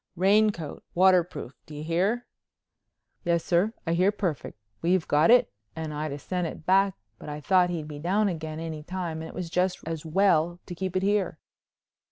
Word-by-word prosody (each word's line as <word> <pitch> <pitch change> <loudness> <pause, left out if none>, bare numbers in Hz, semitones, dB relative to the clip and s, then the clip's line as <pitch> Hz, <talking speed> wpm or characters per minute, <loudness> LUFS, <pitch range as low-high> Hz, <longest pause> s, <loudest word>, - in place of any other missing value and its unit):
Raincoat, 195 -3 +2
waterproof. 180 -7 +3
Do 155 - -9
you 150 - -6
hear?" 190 +9 0 1.0
"Yes 170 -1 +1
sir, 180 +5 +2
I 165 - 0
hear 185 +4 +3
perfect. 180 - -3 0.2
We've 175 0 +2
got 150 +5 +4
it 245 - +5 0.2
and 160 -2 -4
I'd 150 0 -3
'a' 140 - -4
sent 180 +3 -2
it 160 - -9
back 195 +1 +4 0.2
but - - -8
I 150 0 -5
thought 180 +3 +3
he'd 165 -4 -3
be 150 -1 -7
down 195 +7 +1
again 160 -3 -4
any 160 -2 -5
time 170 -1 -4
and 160 - -7
it - - -11
was 175 -2 -5
just 180 +1 +1
as 165 -1 -4
well 170 0 +2
to - - -7
keep 185 +1 -4
it 185 - 0
here." 200 -4 +1
175 Hz, 190 wpm, -27 LUFS, 160-190 Hz, 1.0 s, it